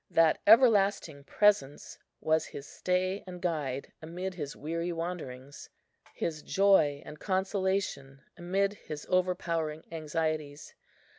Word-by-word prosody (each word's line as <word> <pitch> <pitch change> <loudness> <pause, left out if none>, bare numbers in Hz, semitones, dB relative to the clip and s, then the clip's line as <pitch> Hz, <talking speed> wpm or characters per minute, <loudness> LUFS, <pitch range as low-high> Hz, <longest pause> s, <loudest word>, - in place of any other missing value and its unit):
That 165 -1 +3
Everlasting 200 - +4
Presence 175 -10 +1 0.2
was 160 0 +2
his 140 - -9
stay 185 +4 -1
and 180 -1 -8
guide 150 -7 -3
amid 180 +4 -5
his 150 -5 -6
weary 165 +3 -3
wanderings, 155 -6 -6 0.5
his 155 -2 -3
joy 160 -8 +3
and 150 - -10
consolation 190 -8 -1
amid 195 +3 0
his 155 -7 -8
overpowering 170 -4 0
anxieties. 155 -2 -3
165 Hz, 105 wpm, -30 LUFS, 150-185 Hz, 0.5 s, Everlasting